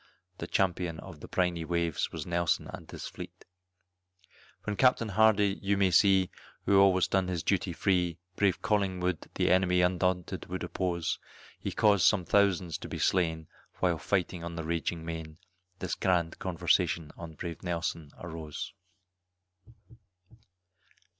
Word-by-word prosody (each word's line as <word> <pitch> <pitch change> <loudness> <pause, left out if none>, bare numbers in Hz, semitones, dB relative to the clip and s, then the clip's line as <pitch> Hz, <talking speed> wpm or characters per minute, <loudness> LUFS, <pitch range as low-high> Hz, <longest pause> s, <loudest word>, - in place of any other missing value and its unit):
The - - -4
champion 90 -3 0
of 90 -5 -11
the - - -9
briny 90 -2 0
waves 85 -1 -1
was 80 -3 -5
Nelson 85 -1 0
and - - -9
his - - -7
fleet; - - -9 1.2
When 105 - -2
Capt. 130 +4 +5
Hardy, 105 -2 +3
you 100 0 +1
may 95 -2 +3
see, 95 0 +4 0.3
who 100 -1 +5
always 95 -2 +5
done 95 -2 +1
his 90 -3 -2
duty 95 -2 +1
free, 90 -1 +1 0.2
Brave 100 -3 +1
Collingwood 95 -4 0
the - - +2
enemy 90 -1 +4
undaunted 90 0 0
would 95 +1 -4
oppose, 85 -3 -2 0.4
He - - -3
caused 100 -4 +4
some 90 -4 +3
thousands 90 -3 +2
to - - -8
be - - -4
slain 80 -4 +1 0.3
while 85 -3 +1
fighting 90 -3 -1
on 85 0 -5
the 85 - -4
raging 85 0 -2
main, 80 -2 -6 0.4
This 95 -2 -3
grand 85 -3 0
conversation 85 -3 +1
on 85 -2 -9
brave 85 +1 -6
Nelson 85 -3 -3
arose. 80 -3 -6
90 Hz, 140 wpm, -30 LUFS, 85-95 Hz, 1.2 s, Capt